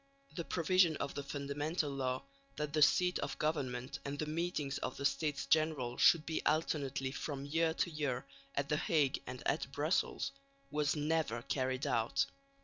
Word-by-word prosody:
The 170 - -2
provision 170 -1 +3
of 140 - -3
the 145 - -3
Fundamental 145 +3 -2
Law 130 -1 -1 0.3
that 150 -1 -3
the 155 - +2
seat 180 +4 +5
of - - -3
government 135 -3 -1
and 140 0 -4
the 155 - -1
meetings 155 -3 -2
of - - -4
the 140 - -3
States 150 0 0
General 150 -5 +2
should 165 -2 +6
be 160 - -2
alternately 140 -4 0
from 140 -1 -4
year 160 +2 +1
to 175 - 0
year 140 -4 -2 0.3
at 140 0 0
the 150 - +2
Hague 150 -4 +2
and - - -6
at - - 0
Brussels - - 0 0.4
was 150 -1 +1
never 150 -6 0
carried 130 +1 -1
out. 115 -2 +2
145 Hz, 165 wpm, -35 LUFS, 135-160 Hz, 0.4 s, should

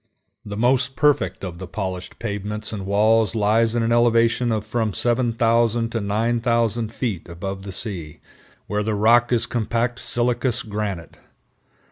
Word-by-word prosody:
The 100 0 -6
most 125 +3 +2
perfect 145 -6 +1
of 90 -3 -6
the 95 - -7
polished 95 -1 -5
pavements 105 +2 -4
and 95 -3 -5
walls 110 +2 +3
lie 110 +1 +3
at 115 0 +1
an 115 -1 +1
elevation 115 0 +3
of 110 -2 -1
from 110 -1 -1
7000 115 -1 +1
to 115 - -2
9000 115 +1 0
feet 110 -9 -4
above 95 +3 -5
the 100 0 -7
sea, 90 -7 -5 0.5
where 105 +1 -1
the 110 0 -1
rock 115 +4 +4
is 115 -2 +3
compact 120 +1 -1
silicious 120 0 0
granite. 105 -6 -5
115 Hz, 145 wpm, -22 LUFS, 100-120 Hz, 0.5 s, rock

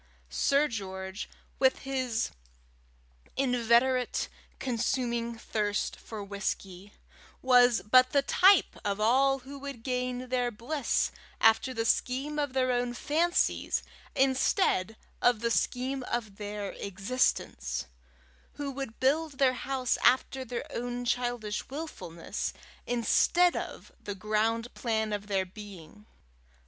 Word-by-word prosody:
Sir 280 +2 +3
George, 190 -4 -5 0.3
with 265 -1 +3
his 255 -4 -1 1.1
inveterate, 250 0 +2 0.3
consuming 235 -2 -1
thirst 210 -2 -1
for 215 -2 -8
whisky, 200 -1 -5 0.5
was 245 -2 +5
but 255 +4 +6
the 280 0 +2
type 380 +5 +5
of 200 -1 -1
all 265 +5 +4
who 280 +1 -8
would 275 -4 -7
gain 250 0 -2
their 250 -1 +1
bliss 240 +5 -1 0.3
after 225 +4 +4
the 225 -3 -2
scheme 270 +6 0
of 285 -3 -1
their 255 -1 +2
own 245 0 0
fancies, 330 +7 +1 0.3
instead 265 - +2 0.2
of 245 -3 +3
the 235 0 0
scheme 260 +3 0
of 215 -6 -3
their 205 -1 -4
existence; 185 - -1 0.7
who 285 -1 -4
would 270 -4 -6
build 295 +4 +2
their 265 -1 +3
house 255 -1 -1
after 260 +1 +2
their 245 -1 -4
own 245 +1 -3
childish 240 -4 -1
wilfulness 265 - -5 0.3
instead 340 +9 +3
of - - -6
the 205 - -4
ground 220 +4 0
plan 220 -3 -1
of 205 0 -4
their 195 -2 +1
being. 200 0 -12
245 Hz, 115 wpm, -29 LUFS, 215-265 Hz, 1.1 s, but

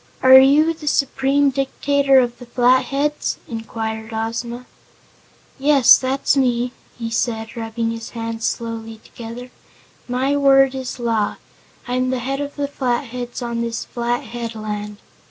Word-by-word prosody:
"Are 260 0 +10
you 295 +5 +5
the 310 -2 -11
Supreme 275 0 +2
Dictator 275 +1 +2
of 240 -2 +2
the 245 - -11
Flatheads?" 260 +4 +1
inquired 220 -1 -5
Ozma. 230 +2 -4 0.9
"Yes, 275 -2 +7
that's 265 +1 0
me," 245 -2 +1 0.3
he 230 -1 -5
said, 225 -1 -2
rubbing 225 0 -3
his 230 0 -6
hands 230 0 -4
slowly 225 -1 -5
together. 240 +2 -9 0.6
"My 260 +3 0
word 270 -1 +5
is 260 -1 -5
law. 230 -4 0 0.5
I'm 255 +1 0
the 260 - 0
head 270 +3 -3
of 285 0 -5
the 285 -1 -2
Flatheads 245 -2 -3
on 235 -1 -3
this 230 -1 -3
flat 240 0 -2
headland." 215 -3 -5
245 Hz, 135 wpm, -20 LUFS, 230-270 Hz, 0.9 s, Are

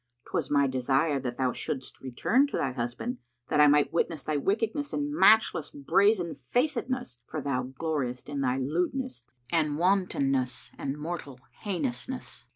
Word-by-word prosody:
'Twas - - -1
my 140 -1 +4
desire 135 +3 +1
that 125 -2 -4
thou 130 -1 +1
shouldst 130 -2 -5
return 215 - +2
to - - -3
thy 135 - 0
husband, 125 - -3 0.3
that 150 - +4
I 150 - +8
might 145 +1 +4
witness 165 -3 0
thy 155 - -1
wickedness 225 - 0
and 290 0 -1
matchless 220 - +5
brazenfacedness; 200 - 0
for 155 - -4
thou 130 -2 -2
gloriest 140 -7 -2
in 145 -1 -3
thy 130 -1 +1
lewdness 170 - -2 0.3
and 155 -3 +1
wantonness 140 -8 +1
and 140 +1 -4
mortal 150 -4 -5 0.2
heinousness." 245 +6 -4
150 Hz, 145 wpm, -28 LUFS, 135-210 Hz, 0.3 s, I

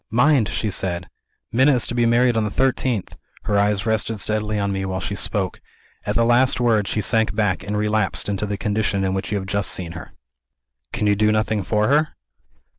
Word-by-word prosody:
'Mind!' 125 0 +3
she 110 - -2
said, 90 -2 -1 0.4
'Minna 130 +4 +4
is 120 - 0
to - - -5
be 120 -1 +2
married 120 +1 +3
on 110 - +1
the 105 - -1
thirteenth!' 130 -3 -1 0.2
Her 100 -1 +1
eyes 100 0 +1
rested 110 -1 -1
steadily 105 0 -2
on 100 -1 -1
me, 95 0 -2
while 95 -1 -3
she 95 - -4
spoke. 95 0 -2 0.5
At 105 - -1
the 115 - +3
last 125 +2 +3
word, 110 -5 +2
she 105 - -1
sank 110 -2 +1
back, 105 -4 0
and 105 0 -3
relapsed 105 +1 0
into 100 +1 -2
the 100 0 -3
condition 100 -1 -1
in 95 0 0
which 95 +2 -3
you 105 - 0
have 95 - -4
just 100 0 -1
seen 85 -2 -2
her." - - -9 0.8
"Can 120 -3 -2
you 105 0 +3
do 105 +1 +2
nothing 110 0 0
for 105 +3 0
her?" 150 +2 +2
105 Hz, 210 wpm, -21 LUFS, 100-115 Hz, 0.8 s, Minna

